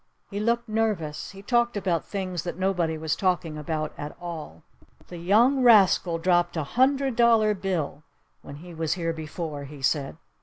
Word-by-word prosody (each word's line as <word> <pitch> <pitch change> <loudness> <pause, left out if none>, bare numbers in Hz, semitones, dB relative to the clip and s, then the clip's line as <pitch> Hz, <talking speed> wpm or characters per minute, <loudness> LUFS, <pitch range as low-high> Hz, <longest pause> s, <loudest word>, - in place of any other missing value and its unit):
He 200 - -3
looked 235 +2 0
nervous. 215 -9 -2
He 195 0 -12
talked 240 0 +1
about 180 -5 -1
things 185 -4 -3
that 175 0 -5
nobody 180 -4 0
was 155 0 -1
talking 180 -4 0
about 155 0 -3
at 145 0 -7
all. 160 - -8 0.5
"The 175 - -8
young 230 +10 +3
rascal 195 -7 +5
dropped 175 0 +1
a 160 - 0
hundred 265 - +1
dollar 225 -3 +4
bill 180 -7 -3 0.4
when 140 - -10
he 175 +4 -11
was 160 -1 -1
here 165 -2 -2
before!" 155 -2 -6
he 140 -1 -11
said. 140 +2 0
175 Hz, 165 wpm, -26 LUFS, 160-215 Hz, 0.5 s, rascal